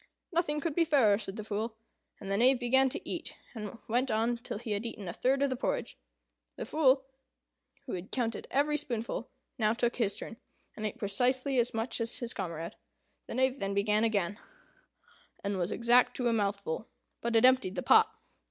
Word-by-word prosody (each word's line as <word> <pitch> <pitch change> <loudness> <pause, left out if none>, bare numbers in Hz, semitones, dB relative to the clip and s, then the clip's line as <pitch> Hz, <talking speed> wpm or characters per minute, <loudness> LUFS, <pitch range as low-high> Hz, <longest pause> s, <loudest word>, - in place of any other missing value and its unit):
"Nothing 325 -3 0
could 315 +1 -2
be 335 - +3
fairer," 260 -11 +4
said 195 -2 -5
the 215 - -5
Fool; 220 +2 -3 0.4
and 195 -1 -6
the - - +2
Knave 250 +3 +5
began 265 +2 +4
to - - -5
eat, - - -5 0.2
and 215 -1 -6
went 245 +4 +1
on 225 +2 +1
till 235 -3 -6
he 225 0 -6
had 205 +1 -1
eaten 220 -4 -6
a 170 - -4
third 270 +6 +2
of 280 - +1
the - - 0
porridge. - - -2 0.6
The - - -5
Fool, 270 -3 +3 0.8
who 255 - -5
had 185 +1 -5
counted 230 -4 -2
every 295 +2 +2
spoonful, 240 -6 -3 0.3
now 215 -1 +3
took 240 0 0
his 215 -5 +1
turn, 225 - -6 0.4
and 215 -1 -2
ate 215 - -7
precisely 250 +5 +1
as 235 -1 0
much 225 +2 -1
as 230 +1 +1
his 240 -1 -2
comrade. 170 -3 -4 0.5
The - - -5
Knave 260 +1 +2
then 195 0 -2
began 210 +2 +2
again, 205 -3 0 1.0
and 200 -1 -1
was 175 +1 -1
exact 240 +2 +4
to 250 - 0
a 235 - +3
mouthful; 200 -3 -1 0.3
but 235 0 -1
it 225 - +6
emptied 255 -7 +4
the 180 - -2
pot. 440 0 +6
230 Hz, 195 wpm, -31 LUFS, 205-260 Hz, 1.0 s, it